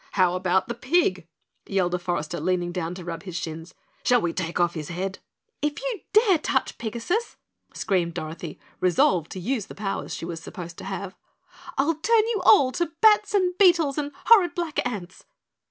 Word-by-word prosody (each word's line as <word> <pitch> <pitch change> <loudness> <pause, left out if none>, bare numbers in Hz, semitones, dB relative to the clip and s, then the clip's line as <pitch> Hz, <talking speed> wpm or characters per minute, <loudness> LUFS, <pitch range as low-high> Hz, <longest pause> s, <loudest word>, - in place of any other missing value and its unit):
"How 185 -2 +3
about 185 0 +1
the 235 - -3
pig?" 245 - +1 0.4
yelled 185 -3 0
a 180 - 0
forester, 175 -2 -3
leaning 175 +1 0
down 175 -1 -3
to 180 - -8
rub 170 -1 -5
his 185 -4 -8
shins. 165 -1 -6 0.3
"Shall 245 -1 +4
we 170 -5 -1
take 170 -1 -3
off 175 -1 +2
his 155 -3 -6
head?" 190 +2 -4 0.4
"If 295 0 -1
you - - -3
dare 420 -5 +5
touch 265 -3 -1
Pigasus," 240 - -2 0.4
screamed 175 -4 0
Dorothy, 160 -1 -6 0.2
resolved 175 -2 +2
to 185 - -6
use 225 +2 -2
the - - -10
powers 195 -1 -4
she - - -6
was 165 -1 -5
supposed 170 0 -8
to - - -8
have, 195 0 -5 0.6
"I'll 290 +5 +3
turn 435 +8 +3
you 430 -5 0
all 275 -11 +6
to 340 +2 -2
bats 420 -1 +5
and 365 -2 +2
beetles 335 -7 +4
and 290 -1 -3
horrid 380 -7 +6
black 340 -4 -1
ants." 190 -7 -7
195 Hz, 185 wpm, -25 LUFS, -, 0.6 s, all